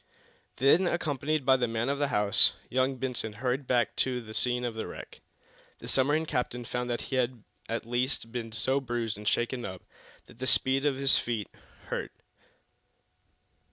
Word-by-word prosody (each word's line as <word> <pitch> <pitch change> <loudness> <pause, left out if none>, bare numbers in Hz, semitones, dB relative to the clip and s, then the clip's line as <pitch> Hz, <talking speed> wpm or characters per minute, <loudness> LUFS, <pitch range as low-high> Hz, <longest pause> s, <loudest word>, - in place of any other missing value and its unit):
Then, 150 +8 +4
accompanied 155 -3 -1
by 130 0 +6
the 125 -1 +1
man 115 +1 -1
of 140 +1 -1
the 145 - +2
house, 105 -2 +4 0.2
young 130 +1 +1
Benson 125 -4 -3
hurried 125 +4 -2
back 120 -1 +1
to 130 -1 +1
the 110 -2 -10
scene 125 +1 +3
of 120 - -2
the 110 - -4
wreck. - - -10 0.6
The - - -10
submarine 145 +4 +2
captain 125 -4 -2
found 125 +1 -3
that 120 - -1
he 130 - -3
had 125 -3 -1 0.3
at 115 0 -2
least 120 0 -1
been 115 -2 -4
so 130 +5 +1
bruised 120 -3 -2
and 105 0 -8
shaken 120 +2 0
up 95 -3 -7 0.4
that 125 - -11
speed 135 +3 +3
on 140 - +1
his 135 0 +4
feet 115 -4 -3 0.4
hurt. - - -3
125 Hz, 170 wpm, -29 LUFS, 115-135 Hz, 0.6 s, by